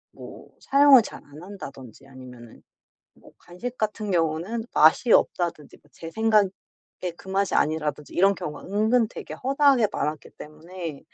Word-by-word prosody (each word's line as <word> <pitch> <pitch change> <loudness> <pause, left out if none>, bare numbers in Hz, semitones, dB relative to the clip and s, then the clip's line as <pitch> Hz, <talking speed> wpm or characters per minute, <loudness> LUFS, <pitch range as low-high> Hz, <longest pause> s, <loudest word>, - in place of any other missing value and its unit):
뭐 - - -12
사용을 275 -2 +6
잘 210 - -10
안 145 +2 -14
한다든지 140 - -11
아니면은 125 -3 -14 0.5
뭐 - - -19
간식 235 +8 -8
같은 215 -1 -3
경우는 170 +7 -1
맛이 160 +9 +4
없다든지 165 -5 0
뭐 - - -27
제 165 0 -9
생각에 215 -2 +2 0.7
그 190 - -15
맛이 195 0 0
아니라든지 150 -1 -1
이런 195 +2 +3
경우가 175 -6 -7
은근 220 +4 +2
되게 215 - -9
허다하게 270 -3 +2
많았기 150 0 -4
때문에 160 0 -9
180 Hz, 325 characters per minute, -24 LUFS, 150-220 Hz, 0.7 s, 사용을